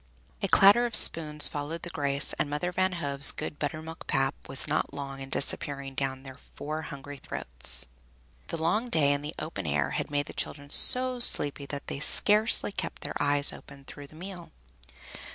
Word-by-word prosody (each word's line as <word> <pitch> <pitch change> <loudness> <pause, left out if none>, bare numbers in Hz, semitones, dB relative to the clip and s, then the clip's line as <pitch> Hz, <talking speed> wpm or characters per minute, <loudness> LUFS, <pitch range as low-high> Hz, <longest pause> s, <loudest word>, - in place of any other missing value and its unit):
A 195 - -1
clatter 205 +6 +5
of 230 - +3
spoons 150 -6 +7
followed 150 +3 -6
the 175 - -6
grace, 140 -2 -2
and 145 - -1
Mother 150 +5 -3
Van 185 +1 -1
Hove's 140 -4 +3
good 155 -1 -7
buttermilk 155 +2 -7
pap 135 -1 -1 0.2
was 135 - 0
not 150 -1 -3
long 135 -1 -7
in 135 0 -9
disappearing 140 0 -2
down 135 -1 -4
their 135 -1 -12 0.2
four 155 +2 -6
hungry 140 -1 -10
throats. 60 - -2 0.6
The 165 - -5
long 210 +10 -2
day 145 -7 +2
in 140 - -4
the 150 +1 -8
open 125 - -7
air 70 -1 -1
had - - -4
made 145 0 -2
the - - -11
children 145 -1 -5
so 255 0 +5
sleepy 145 - +2
they 145 - -5
could 140 - -8
scarcely 210 +6 +3
keep 185 -4 -7
their - - -6
eyes 145 0 +1
open 140 -1 -14
through 145 0 -10
the 155 - -19
meal. 180 0 -10
145 Hz, 185 wpm, -27 LUFS, 140-170 Hz, 0.6 s, spoons